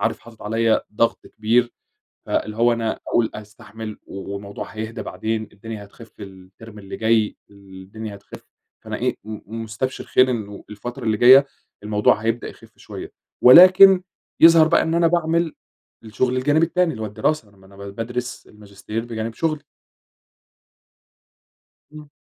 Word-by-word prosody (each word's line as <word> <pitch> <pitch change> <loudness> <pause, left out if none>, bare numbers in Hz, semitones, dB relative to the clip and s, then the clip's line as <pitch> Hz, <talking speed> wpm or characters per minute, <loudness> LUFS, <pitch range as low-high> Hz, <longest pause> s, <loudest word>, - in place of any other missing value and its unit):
عارف - - -1
حاطط 115 -1 -15
عليّا 115 +1 +1
ضغط 115 +2 0
كبير 120 +3 0 0.5
فاللي 105 +1 -2
هو 120 +1 +3
أنا 115 -1 -3
أقول 115 -2 +1
أستحمل 105 +1 -10
و 100 0 -7
والموضوع 100 0 -7
هيهدى 110 +1 -6
بعدين 110 -1 -4
الدنيا 110 0 -8
هتخف 110 +2 -16
في 105 - -12
الترم 95 +3 -14
اللي 100 -1 -8
جاي 110 -1 +1
الدنيا 100 +2 -10
هتخف، 100 - -14 0.4
فأنا - - -5
إيه - - -1
م 110 +1 -8
مستبشر 110 +4 -4
خير 130 0 +3
إنه 105 -4 -6
الفترة 120 +5 -8
اللي 110 -1 0
جاية 130 +4 +7 0.4
الموضوع 105 0 +2
هيبدأ 115 +2 -3
يخف - - -15
شوية، - - -9 0.3
ولكن 185 +6 +8 0.4
يظهر 165 -1 +7
بقى - - +3
إن 160 - -2
أنا 170 -1 +3
باعمل 170 -1 0 0.5
الشغل 125 +3 -1
الجانبي 145 +5 +2
التاني 180 0 0
اللي 110 - -8
هو - - -2
الدراسة، 105 +2 -2
ما 95 -1 -22
أنا 100 - -18
بادرس 115 +5 -6
الماجستير 105 +2 -8
بجانب 115 -1 -5
شغلي. 155 +2 -2 2.3
إمم. 150 -1 -12
115 Hz, 145 wpm, -21 LUFS, 105-130 Hz, 2.3 s, ولكن